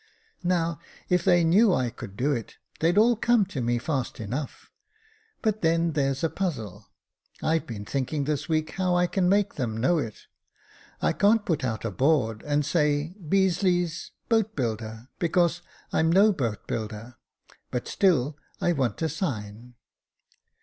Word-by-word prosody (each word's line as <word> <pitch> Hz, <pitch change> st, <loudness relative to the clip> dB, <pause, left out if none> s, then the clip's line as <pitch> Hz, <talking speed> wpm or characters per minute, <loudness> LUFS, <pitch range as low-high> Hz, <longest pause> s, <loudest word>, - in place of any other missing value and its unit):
Now, 170 Hz, -3 st, 0 dB, 0.3 s
if 180 Hz, -1 st, +2 dB
they 175 Hz, 0 st, +4 dB
knew 195 Hz, +6 st, +5 dB
I 125 Hz, -2 st, 0 dB
could 100 Hz, -2 st, -10 dB
do 140 Hz, +4 st, +1 dB
it, 120 Hz, -5 st, -3 dB, 0.2 s
they'd 170 Hz, +4 st, +2 dB
all 235 Hz, +3 st, +5 dB
come 230 Hz, -1 st, +3 dB
to 150 Hz, -9 st, -5 dB
me 120 Hz, 0 st, +1 dB
fast 130 Hz, 0 st, -3 dB
enough; 125 Hz, +7 st, -5 dB, 0.7 s
but 215 Hz, -1 st, 0 dB
then 165 Hz, 0 st, +2 dB
there's 135 Hz, -1 st, 0 dB
a 165 Hz, -, +2 dB
puzzle; 115 Hz, -, -4 dB, 0.5 s
Fve 160 Hz, 0 st, +1 dB
been 105 Hz, -3 st, -6 dB
thinking 140 Hz, +4 st, -2 dB
this 150 Hz, +2 st, -2 dB
week 155 Hz, 0 st, 0 dB
how 185 Hz, -2 st, 0 dB
I 175 Hz, 0 st, +3 dB
can 180 Hz, 0 st, +1 dB
make 200 Hz, +1 st, +2 dB
them 115 Hz, -4 st, -3 dB
know 145 Hz, +9 st, +2 dB
it. 115 Hz, -7 st, -5 dB, 0.8 s
I -, -, +3 dB
can't 210 Hz, +1 st, +3 dB
put 160 Hz, -6 st, 0 dB
out 115 Hz, -3 st, -2 dB
a 115 Hz, -, -1 dB
board 120 Hz, -, +1 dB
and 145 Hz, 0 st, +1 dB
say, 150 Hz, 0 st, +1 dB
Beazeley, 180 Hz, -1 st, +2 dB, 0.3 s
Boat 220 Hz, -2 st, +1 dB
builder, 110 Hz, -2 st, -3 dB
because 170 Hz, 0 st, +2 dB, 0.3 s
I'm 160 Hz, +1 st, +3 dB
no 200 Hz, +4 st, +5 dB
boat 115 Hz, -, -3 dB
builder, 110 Hz, +2 st, -5 dB, 0.5 s
but 125 Hz, -, -3 dB
still 155 Hz, -6 st, +2 dB, 0.2 s
I 175 Hz, -, +2 dB
want 130 Hz, -2 st, -1 dB
a -, -, +2 dB
sign." 120 Hz, -, -5 dB
155 Hz, 155 wpm, -26 LUFS, 120-180 Hz, 0.8 s, knew